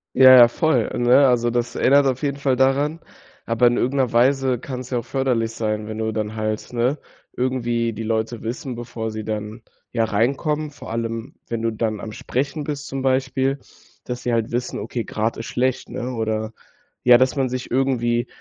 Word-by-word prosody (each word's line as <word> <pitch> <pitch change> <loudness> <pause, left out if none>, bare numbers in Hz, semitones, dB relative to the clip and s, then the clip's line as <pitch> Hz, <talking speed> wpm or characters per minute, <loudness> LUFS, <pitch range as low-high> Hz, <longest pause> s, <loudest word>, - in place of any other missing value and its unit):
Ja, 130 0 +9
ja, 120 -1 +10
voll, 125 -2 +1
ne? 125 +3 +5
Also, 120 -2 +2
das 120 0 -1
erinnert 140 +1 +4
auf 130 -1 0
jeden 140 -1 -1
Fall 140 -2 +1
daran. 140 +5 +1 0.5
Aber 115 +1 +3
in 120 0 +3
irgend 130 +3 0
'ner 130 -4 +1
Weise 130 +1 +3
kann's 130 -1 -7
ja 125 - 0
auch 120 - -5
förderlich 120 -4 0
sein, 105 -1 -2
wenn 110 - -5
du 110 0 -1
dann 110 0 -3
halt, 110 0 -3
ne 125 +5 +1 0.4
irgendwie 120 -2 -1
die 115 - -5
Leute 110 +1 -2
wissen, 125 +3 -4
bevor 115 -1 -5
sie 110 0 -6
dann, 110 +1 -5 0.3
ja, 115 -2 +1
reinkommen, 140 +8 0
vor 145 - -11
allem, 115 0 -4
wenn 115 -1 -3
du 115 - +1
dann 110 -1 -2
am 110 +1 -7
Sprechen 140 +7 -3
bist 145 0 -5
zum 135 - -4
Beispiel, 130 +1 0 0.5
dass 125 0 -5
sie 120 -1 0
halt 115 0 -1
wissen: 125 +1 -2
Okay, 115 +2 -4
gerade 110 +1 -2
ist - - -5
schlecht, 130 +1 -1
ne, 125 +1 -4
oder 110 -1 -2 0.5
ja, 125 -1 +8
dass 130 +3 +2
man 135 -2 +1
sich 125 0 -5
irgendwie 120 -2 +1
120 Hz, 195 wpm, -22 LUFS, 115-130 Hz, 0.5 s, ja